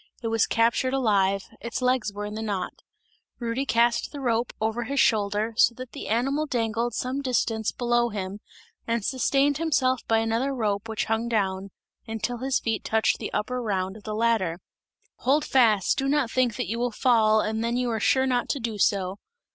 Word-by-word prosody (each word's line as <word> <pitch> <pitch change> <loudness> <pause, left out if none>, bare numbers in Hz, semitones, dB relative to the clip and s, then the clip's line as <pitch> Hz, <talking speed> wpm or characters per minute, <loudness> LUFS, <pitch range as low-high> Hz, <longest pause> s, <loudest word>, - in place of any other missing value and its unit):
It 225 - -1
was 225 -1 +2
captured 235 +3 +2
alive, 200 -6 +2 0.2
its 235 -1 -4
legs 250 -4 +1
were 205 +1 -5
in 210 - -6
the 220 - -4
knot; 200 -4 -3 0.6
Rudy 240 +3 -2
cast 235 +1 +2
the 290 - -7
rope 235 -2 0
over 225 +2 -1
his 280 +3 -1
shoulder, 210 0 +2
so 235 +1 +4
that 255 0 -8
the - - -7
animal 275 +7 0
dangled 230 -2 -1
some 260 +2 -2
distance 230 -4 0
below 240 -1 +1
him, 200 -1 -5 0.5
and 230 -2 -1
sustained 275 +2 +1
himself 265 -6 +1
by 225 - +3
another 230 +5 0
rope 210 -2 -1
which 220 - -1
hung 225 +2 -1
down, 195 -3 -1 0.4
until 225 +2 -3
his 265 +1 0
feet 225 -2 -2
touched 220 0 +1
the - - -5
upper 250 +4 -2
round 190 -4 -2
of 215 - -11
the 215 0 -5
ladder. 215 -7 +1 0.6
"Hold 285 +4 +1
fast, 225 -2 +3
do 270 - 0
not 275 -4 +1
think 250 -4 +1
that - - -3
you 230 +4 -3
will 245 +1 +1
fall 220 -3 +3
and 220 +1 -2
then 235 +1 0
you 250 -1 0
are 225 - -1
sure 260 +5 +3
not 250 -2 0
to 285 - -1
do 225 -3 -4
so!" 195 0 +1
230 Hz, 195 wpm, -26 LUFS, 215-250 Hz, 0.6 s, so